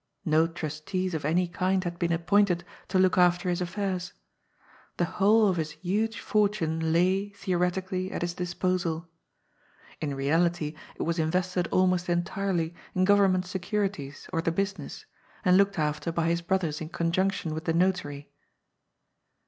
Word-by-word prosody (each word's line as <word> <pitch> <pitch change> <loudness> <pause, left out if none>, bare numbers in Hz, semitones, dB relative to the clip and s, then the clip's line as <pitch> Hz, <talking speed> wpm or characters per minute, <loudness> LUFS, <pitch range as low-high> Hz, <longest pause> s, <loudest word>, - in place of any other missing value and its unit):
No 160 0 +4
trustees 165 +3 -3
of 155 -3 -3
any 175 +4 +2
kind 185 +2 0
had 175 -1 -4
been 170 -1 0
appointed 175 +1 +2 0.2
to 190 - 0
look 185 0 +4
after 180 +1 +3
his 175 0 0
affairs. 185 0 -3 0.8
The 175 - +2
whole 210 +4 +4
of 185 -3 +1
his 155 -2 -2
huge 210 +6 -1
fortune 170 -7 +1
lay, 185 +4 +2
theo 195 -3 -2
retically, 185 +1 -1
at - - -3
his 175 0 -2
disposal. 175 -2 -1 0.9
In 145 -3 -2
reality 155 +3 +1 0.2
it - - -3
was 170 +1 -1
invested 180 +2 0
almost 185 -1 +2
entirely 175 -1 -1 0.2
in 185 0 +3
government 195 -2 +4
securities 185 -5 -3
or 165 - +1
the 165 - 0
business, 195 -3 -3 0.4
and 180 - +6
looked 200 0 +3
after 150 +1 -1
by 165 0 0
his 170 0 +1
brothers 170 -4 -1
in 160 - -5
conjunction 170 0 0
with 160 +2 -5
the 165 - +1
notary. 165 -5 0
180 Hz, 150 wpm, -28 LUFS, 165-190 Hz, 0.9 s, and